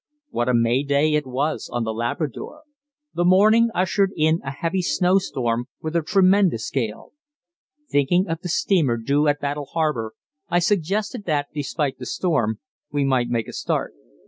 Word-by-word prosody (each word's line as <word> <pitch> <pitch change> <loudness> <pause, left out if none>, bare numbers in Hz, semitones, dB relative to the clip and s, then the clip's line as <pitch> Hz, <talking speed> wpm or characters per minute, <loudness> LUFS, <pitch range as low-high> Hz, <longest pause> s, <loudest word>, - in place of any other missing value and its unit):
What 120 +1 -1
a 125 - +3
May 115 +3 +2
Day 145 +2 +1
it 150 -2 0
was 140 +5 -2
on 120 -1 -1
The 110 0 -2
Labrador! 135 - -4 0.5
The 175 - 0
morning 215 +6 +5
ushered 190 +2 +1
in 160 +1 +2
a 140 - -4
heavy 165 +6 -2
snow 180 +1 +2
storm, 120 -9 -2
with 160 +1 -5
a 170 - +3
tremendous 185 - +2
gale. 115 -6 -3 0.8
Thinking 175 - +2
of 165 -1 -3
the 180 - -5
steamer 165 -8 +2
due 140 +6 +1
at 145 0 +2
Battle 145 0 -3
Harbour, 130 -9 -1 0.4
I 175 - +2
suggested 205 +5 0
that, 145 -3 -1
despite 145 -2 -2
the 125 - -6
storm, 125 - 0 0.3
we 145 -1 0
might 130 -3 +1
make 115 -2 -1
a - - -8
start. - - -2
150 Hz, 170 wpm, -22 LUFS, 130-180 Hz, 0.8 s, morning